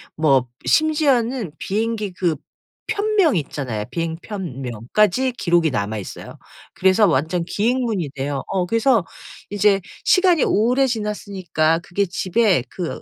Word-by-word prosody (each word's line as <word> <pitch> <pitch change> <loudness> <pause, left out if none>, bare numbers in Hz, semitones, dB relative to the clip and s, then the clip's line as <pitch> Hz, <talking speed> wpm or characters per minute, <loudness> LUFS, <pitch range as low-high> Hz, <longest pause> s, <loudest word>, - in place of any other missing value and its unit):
뭐 135 -5 +3 0.2
심지어는 265 - +2
비행기 215 -1 -2
그 175 -3 0 0.5
편명 405 -7 +2
있잖아요. 135 -8 -3
비행 165 -1 -2
편명까지 180 - -1
기록이 170 -7 +2
남아 105 -2 -2
있어요. 100 - -8 0.4
그래서 190 +3 +4
완전 165 +1 +1
기행문인데요. 180 - -1
어 185 -2 -1
그래서 230 +2 +2 0.5
이제 205 -1 +2 0.2
시간이 365 -4 +4
오래 250 +6 +2
지났으니까 195 -8 -1
그게 180 +3 -1
집에 185 - +1
그 180 -3 -5
190 Hz, 280 characters per minute, -21 LUFS, 160-230 Hz, 0.5 s, 그래서